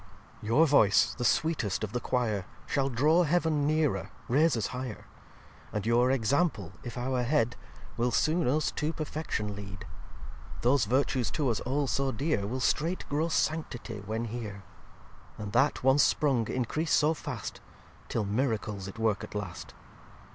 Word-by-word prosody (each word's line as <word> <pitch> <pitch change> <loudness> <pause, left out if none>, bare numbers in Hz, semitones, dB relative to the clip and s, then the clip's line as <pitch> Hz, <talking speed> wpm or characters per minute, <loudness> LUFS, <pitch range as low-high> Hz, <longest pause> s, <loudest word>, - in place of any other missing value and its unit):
xxi 105 - -8
"Your 145 +9 +5
voice, 125 -10 +4
the - - -5
sweetest 120 - +1
of 105 - -3
the 125 - 0
Quire, 115 -6 -1 0.2
Shall 135 -1 0
draw 150 +8 +3
Heav'n 160 -3 +2
nearer, 155 -1 +1 0.2
raise 150 +2 +3
us 110 - -1
higher. 125 -3 -5 0.7
And 105 -1 -3
your 120 +2 +3
Example, 130 - +1
if 120 0 -7
our 125 +1 -1
Head, 120 -2 +1 0.4
Will 120 +1 +2
soon 155 +7 +2
us 150 +5 +1
to 155 +2 -2
perfection 150 -10 -3
lead. 95 -2 -8 0.8
Those 125 +1 +3
Virtues 130 0 +1
to 145 -5 0
us 115 - 0
all 140 +3 -1
so 135 +1 0
dear, 120 -4 -1
Will 130 +5 -3
straight 160 +7 0
grow 150 +3 +1
Sanctity 155 -9 -2
when 110 +3 -3
here: 105 -4 -6 0.7
And 105 -1 -6
that, 135 +3 +2
once 135 +2 +5
sprung, 130 -8 +2
increase 150 +6 -1
so 155 +1 +4
fast - - -6 0.5
Till 110 - -1
Miracles 105 -3 -1
it 100 - -9
work 110 -2 0
at - - -9
last. 100 -4 -6
125 Hz, 155 wpm, -29 LUFS, 110-150 Hz, 0.8 s, Your